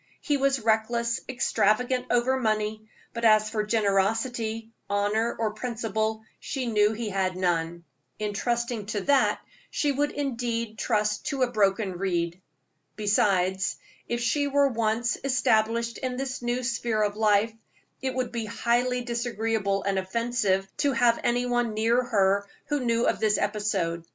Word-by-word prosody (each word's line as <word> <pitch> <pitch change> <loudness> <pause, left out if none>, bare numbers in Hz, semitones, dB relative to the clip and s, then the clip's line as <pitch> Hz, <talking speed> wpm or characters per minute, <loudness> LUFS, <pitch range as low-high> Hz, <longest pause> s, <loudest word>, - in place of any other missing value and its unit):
He 295 - 0
was 275 -1 +2
reckless, 235 +1 +1
extravagant 250 +1 +1
over 255 +2 +2
money, 215 -1 -1 0.3
but 230 - -5
as 215 -1 +5
for 215 -2 0
generosity, 225 +2 0 0.2
honor, 205 +3 +1
or 220 -2 0
principle, 220 -2 -2 0.2
she 265 -3 -4
knew 210 -2 +3
he 225 0 -4
had 190 -2 -1
none. 170 -2 -1 0.3
In 210 -1 -3
trusting 235 -1 -2
to 210 -1 -2
that 280 +2 +3 0.3
she 290 - 0
would 290 +2 0
indeed 235 -5 -3
trust 210 -2 0
to 275 -3 0
a 245 - 0
broken 195 -4 +1
reed. 175 -2 -1 0.5
Besides, 190 -3 +1 0.3
if 235 0 -2
she 285 +5 +1
were 280 0 +3
once 230 0 0
established 235 -3 +1
in 255 -1 -3
this 265 -1 -4
new 240 +1 -1
sphere 235 -3 0
of 205 -1 -1
life, 215 0 +3 0.5
it 260 -1 -2
would 255 -1 -1
be 235 -2 -3
highly 245 +3 0
disagreeable 225 -4 -1
and 195 -1 0
offensive 195 -1 0
to 285 -2 +1
have 235 -1 +3
any 245 +1 +1
one 240 -3 0
near 230 +3 +3
her 200 -3 +2 0.2
who 295 -1 +1
knew 235 0 +1
of - - +1
this 210 -2 +2
episode. 195 -5 -1
225 Hz, 150 wpm, -26 LUFS, 210-245 Hz, 0.5 s, as